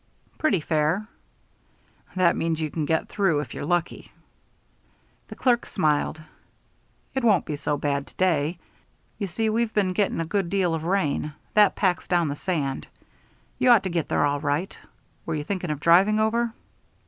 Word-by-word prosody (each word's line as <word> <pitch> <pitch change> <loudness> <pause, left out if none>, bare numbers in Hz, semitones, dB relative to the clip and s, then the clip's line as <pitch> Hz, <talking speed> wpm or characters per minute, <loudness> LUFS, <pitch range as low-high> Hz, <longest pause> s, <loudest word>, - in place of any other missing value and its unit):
"Pretty 225 - +2
fair." 155 +6 0 1.1
"That 180 -2 +3
means 165 -1 -1
you 155 -2 -2
can 155 -2 -2
get 160 +2 0
through 190 -7 +1
if 130 -5 -8
you're - - -5
lucky." 175 -1 -2 1.2
The - - -9
clerk 245 -2 +1
smiled. 155 -3 0 0.9
"It 265 - -2
won't 210 -7 +3
be 150 - -3
so 145 0 -2
bad 140 -1 -1
to - - -18
day. 165 -3 +1 0.6
You 200 - -2
see 220 +5 -1
we've 220 +1 0
been 195 -3 +2
getting 200 -3 0
a 165 - -1
good 190 +1 -1
deal 185 -3 +1
of 160 0 -3
rain. 160 -5 0 0.2
That 210 -2 +5
packs 185 -3 0
down 175 -4 +2
the 140 - -3
sand. 145 -6 -2 0.7
You 255 - +3
ought 235 -5 +6
to 190 - -2
get 170 -3 -1
there - - +2
all 145 0 0
right. 150 +6 -2 0.5
Were 165 - -1
you 150 - -3
thinking 185 0 -3
of 150 -2 -2
driving 190 +7 +4
over?" 230 +2 +1
175 Hz, 170 wpm, -25 LUFS, 150-200 Hz, 1.2 s, ought